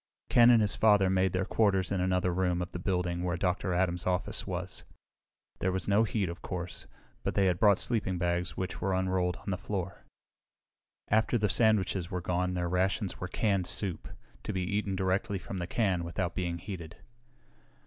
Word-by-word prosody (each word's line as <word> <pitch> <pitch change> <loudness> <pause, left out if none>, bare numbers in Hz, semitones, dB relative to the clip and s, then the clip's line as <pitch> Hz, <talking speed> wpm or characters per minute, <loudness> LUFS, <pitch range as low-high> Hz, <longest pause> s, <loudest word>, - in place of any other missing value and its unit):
Ken 120 0 +7
and 115 -3 +6
his 105 - +2
father 105 -3 +4
made 95 0 +2
their 95 +1 0
quarters 95 -5 +1
in 95 -2 0
another 90 -1 +1
room 90 -1 0
of 90 0 -4
the 90 - -5
building 90 -1 -1
where 90 0 -1
Dr. 90 +1 -1
Adams' 90 0 0
office 90 0 -1
was. - - -5 0.8
There 95 - +1
was 95 +1 -2
no 105 +3 +4
heat, 100 -1 -1
of 85 +1 -7
course, 90 -2 -5 0.3
but - - -3
they 100 - +3
had 90 -2 +1
brought 100 -3 +5
sleeping 105 -6 -1
bags 85 0 -1
which 95 -1 -4
were 95 -1 0
unrolled 95 -1 0
on 100 - -6
the 90 - -2
floor. 95 -1 -4 1.1
After 110 +3 +3
the 105 -2 +1
sandwiches 100 -4 +2
were 90 - -2
gone 90 +1 -1
their 90 -1 -1
rations 95 +3 0
were 90 - -4
canned 100 -2 0
soup, 95 -4 +1 0.3
to - - -4
be 95 -2 -2
eaten 100 +1 -1
directly 95 +1 0
from 95 +1 -6
the 85 - -3
can 95 -4 0
without 85 +1 -3
being 85 -2 -2
heated. 85 -3 -8
95 Hz, 190 wpm, -30 LUFS, 90-100 Hz, 1.1 s, Ken